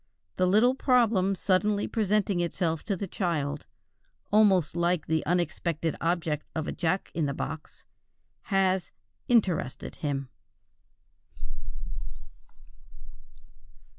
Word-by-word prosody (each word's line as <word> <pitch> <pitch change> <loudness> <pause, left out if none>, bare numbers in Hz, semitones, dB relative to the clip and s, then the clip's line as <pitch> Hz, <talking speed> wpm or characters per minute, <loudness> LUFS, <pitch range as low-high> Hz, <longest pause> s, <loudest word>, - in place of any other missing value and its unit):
The 185 - +3
little 220 +7 +5
problem 230 -8 +3
suddenly 200 +2 +1
presenting 210 -3 +1
itself 170 -2 -1
to 200 - 0
the 200 - -3
child, 155 -6 -2 0.6
almost 195 -7 +4
like 170 -1 +1
the 160 0 0
unexpected 170 -1 0
object 165 -3 -1
of 160 -1 -1
a - - -1
jack 180 +2 -1
in 160 -3 0
the 140 - -2
box, 155 +2 -6 0.6
has 190 -2 +1 0.4
"interested" 190 - +1
him. 140 -3 -2
180 Hz, 100 wpm, -28 LUFS, 160-200 Hz, 0.6 s, little